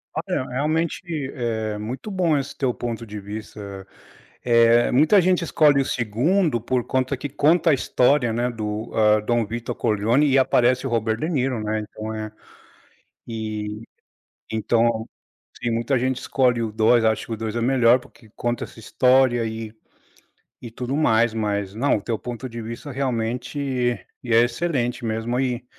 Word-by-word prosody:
Olha, 130 - -2
realmente 155 +6 -1 0.3
é 110 -4 -2
muito 125 - -6
bom 175 -5 +2
esse 140 0 -4
teu 130 -3 0
ponto 120 -1 -5
de 105 -2 -7
vista, 100 -1 -8 0.6
eh, 115 0 +5
muita 155 +10 +5
gente 180 0 +2
escolhe 150 -4 +4
o - - -1
2º 125 - +1
por 125 0 -1
conta 130 +1 0
que 145 - -4
conta 155 +4 +3
a - - +5
história, 130 -1 +2
né, 120 +2 0
do, 110 -1 -4
hã, 105 -1 +4
Dom 120 +1 0
Victor 115 +2 -5
Corleone 115 +5 +2
e 135 - +4
aparece 130 0 +2
o - - -3
Robert 110 -1 0
De 155 - -2
Niro, 130 -8 -1
né, 110 0 -1
então 110 +1 -7
é 110 0 -5 1.0
e 110 -2 -4 0.7
então 115 0 +1 0.5
assim, 120 - -1
muita 120 +4 0
gente 130 0 0
escolhe 125 -3 +1
o 110 - -2
2. 110 +2 +3
Acha 110 -1 +1
que - - -9
o 110 - -4
2 110 0 -4
é - - 0
o - - -1
melhor, 125 -1 +4
porque 115 -2 -19
conta 120 0 -2
essa - - -15
história 125 +1 +3
e 110 -1 -5 0.9
e 120 - -7
tudo 125 +3 -4
mais, 115 -6 +3
mas 100 -3 -2
Não, 125 +5 +1
o - - -7
teu 115 +2 -2
ponto 125 +1 -6
de 115 0 -7
vista 115 +6 -7
realmente 125 +1 -1 0.3
é 115 -1 +5
excelente 120 -2 -1
mesmo 115 +2 -1
e 125 -2 -1
120 Hz, 170 wpm, -23 LUFS, 110-130 Hz, 1.0 s, eh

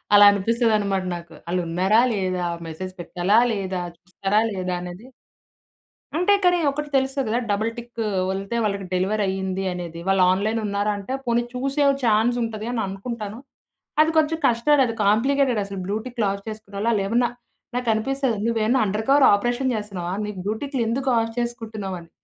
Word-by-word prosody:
అలా 205 0 +9
అనిపిస్తదన్నమాట 205 -2 +1
నాకు. 170 -1 -10
ఆళ్ళు 180 +1 0
ఉన్నారా 190 +7 +3
లేదా? 185 -3 -1 0.2
మెసేజ్ 185 +4 -6
పెట్టాలా 180 +5 +2
లేదా? 190 -3 -2 0.2
చూస్తారా 195 +3 0
లేదా? 185 -1 -2
అనేది. 180 +6 -8 1.1
అంటే, 360 +5 +3
కానీ 355 -1 +4
ఒకటి 295 +1 -4
తెలుస్తది 270 -1 +1
గదా! 235 +3 +1
డబుల్ 215 +3 0
టిక్ 235 0 -9 0.3
వెళ్తే, 195 +4 -3
వాళ్ళకి 200 -2 -1
డెలివరీ 195 +4 +1
అయ్యింది 190 0 -2
అనేది. 170 -2 -6
వాళ్ళు 195 -1 +3
ఆన్‌లైన్ 215 +4 0
ఉన్నారా 205 +1 0
అంటే, 200 +6 -5
పోనీ 235 0 +2
చూసే 275 +3 0 0.2
ఛాన్సుంటది 225 0 +1
అని 240 -2 -1
అనుకుంటాను. 210 +2 -6 0.6
అది 310 +1 +5
కొంచెం 315 +1 +2
కష్టం, 270 +5 +3
అది 230 - -3
కాంప్లికేటెడ్ 250 +3 +3
అసలు 195 0 -7
బ్లూటిక్లు 220 +3 -2
ఆఫ్ 200 0 -7
చేసుకున్నోళ్ళు, 215 0 -3
ఆళ్ళేమన్నా 225 +4 +1 0.5
నాకు 250 -1 -2
అనిపిస్తది, 265 +1 0
నువ్వేమన్నా 230 +2 +2
అండర్ 210 +3 -2
కవర్ 275 0 +6
ఆపరేషన్ 245 +5 0
జేస్తున్నావా? 195 -5 -4
నీకు 210 -2 -6
బ్లూటిక్లు 250 +6 -2
ఎందుకు 260 +3 0
ఆఫ్ 225 0 -1
చేసుకుంటున్నావు? 220 -5 -4
అని. 165 -1 -16
215 Hz, 150 wpm, -23 LUFS, 195-240 Hz, 1.1 s, అలా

